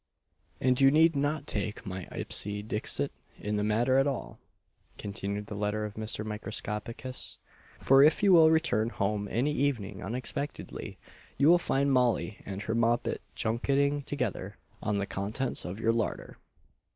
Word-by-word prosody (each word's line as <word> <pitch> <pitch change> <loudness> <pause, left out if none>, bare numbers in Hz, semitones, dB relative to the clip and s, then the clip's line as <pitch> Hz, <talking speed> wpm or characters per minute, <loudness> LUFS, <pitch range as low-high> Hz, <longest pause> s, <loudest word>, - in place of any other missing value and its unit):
"And 130 +1 +2
you 135 - +8
need 160 +2 +5
not 145 +1 0
take 105 -8 -2
my 95 -2 -6
ipse - - +1 0.2
dixit 105 0 -1 0.3
in 105 0 -2
the 105 - 0
matter 120 +5 +3
at 135 - +3
all," 135 -4 -4 0.6
continued 100 0 -4
the 105 - -7
letter 105 +1 -1
of 105 - -6
Mr. 110 0 -3
Microscopicus, 110 +3 -3 0.4
"for 135 +1 +5
if 155 +8 +5
you 195 -2 +6
will 160 -2 +8
return 160 -9 +2
home 105 -1 -1
any 130 +6 +1
evening 115 -9 -1
unexpectedly, 125 +6 -5 0.4
you 145 +3 +5
will 175 +1 +7
find 140 -4 +1
Molly 125 -4 +1
and 100 +1 -5
her 115 - -2
moppet 115 0 +1
junketing 140 +5 +1
together 110 -8 -4 0.2
on 105 -1 0
the 100 - 0
contents 105 +8 -2
of 90 +4 -5
your 115 0 +2
larder." 115 -2 -3
115 Hz, 150 wpm, -29 LUFS, 105-140 Hz, 0.6 s, you